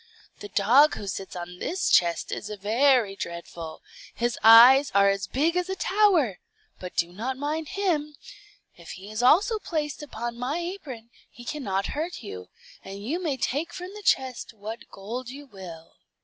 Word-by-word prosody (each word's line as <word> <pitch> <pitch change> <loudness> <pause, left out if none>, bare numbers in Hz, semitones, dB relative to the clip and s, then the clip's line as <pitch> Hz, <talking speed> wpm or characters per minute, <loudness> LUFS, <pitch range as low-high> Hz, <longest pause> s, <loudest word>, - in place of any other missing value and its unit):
The 205 - -8
dog 240 +11 +4
who 205 - -7
sits 195 -1 -6
on 180 0 -7
this 370 +3 -2
chest 170 -1 +3
is 210 - -5
very 220 +1 +2
dreadful; 170 -3 -7 0.3
his 240 -1 -1
eyes 245 +5 +8
are 200 0 +6
as 195 -1 -1
big 310 - 0
as 360 +1 -1
a 380 - -2
tower, 370 - +2 0.4
but 180 -1 -8
do 170 +1 0
not 250 +7 -4
mind 300 +3 -3
him. 305 -7 0 0.6
If 170 -1 -10
he 200 +3 -10
also 400 - +4
is - - -14
placed 300 -3 -3
upon 240 -4 -6
my 255 +6 -2
apron, 305 - -7 0.2
he 240 - -14
cannot 200 -10 -2
hurt 320 -1 -4
you, 90 - -8 0.4
and 195 +1 -9
you 325 +9 -2
may 300 -6 -1
take 300 +6 -2
from 365 +1 -7
the 420 - -9
chest 260 - 0
what 220 +2 -8
gold 235 +6 -7
you 285 +3 -9
will." 180 -8 -12
245 Hz, 170 wpm, -26 LUFS, 200-300 Hz, 0.6 s, eyes